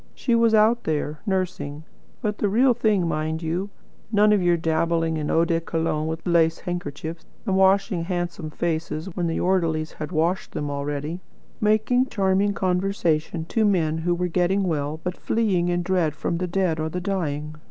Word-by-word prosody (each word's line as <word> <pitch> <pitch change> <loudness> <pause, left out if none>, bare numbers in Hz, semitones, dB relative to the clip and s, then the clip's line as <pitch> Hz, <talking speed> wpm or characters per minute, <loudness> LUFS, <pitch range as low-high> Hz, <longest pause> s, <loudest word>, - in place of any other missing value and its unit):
She 240 - 0
was 230 -1 +4
out 220 +3 +4
there, 150 -1 -2
nursing; 180 -6 -2 0.4
but 210 -1 -1
the 205 - +1
real 245 +5 +4
thing, 215 -6 +1
mind 160 +1 -2
you. 175 +5 -2 0.4
None 210 0 +5
of 205 - +3
your 175 -1 +3
dabbling 165 0 +1
in 150 -1 -2
eau 165 +1 +3
de 165 -1 0
cologne 160 -2 -1
with 160 +1 -4
lace 165 -2 +2
handkerchiefs, 165 -1 -5 0.2
and 190 - +1
washing 190 -2 +3
handsome 175 -2 -3
faces 160 +2 -3
when 175 -2 0
the 165 - -1
orderlies 165 -4 +1
had 155 +2 -7
washed 170 +3 0
them 145 -1 -3
already; 145 +4 -3 0.4
making 220 +4 +2
charming 195 -2 +1
conversation 180 -4 0
to 225 - +1
men 165 -6 +2
who 175 +2 +1
were 180 +1 -1
getting 180 +3 +1
well, 155 -3 -1
but 180 0 -2
fleeing 195 -6 +1
in 175 0 0
dread 175 -4 +1
from 170 +1 -2
the 180 - -1
dead 175 -3 0
or 155 0 -1
the 180 - -3
dying. 155 -6 -2
175 Hz, 175 wpm, -24 LUFS, 160-195 Hz, 0.4 s, None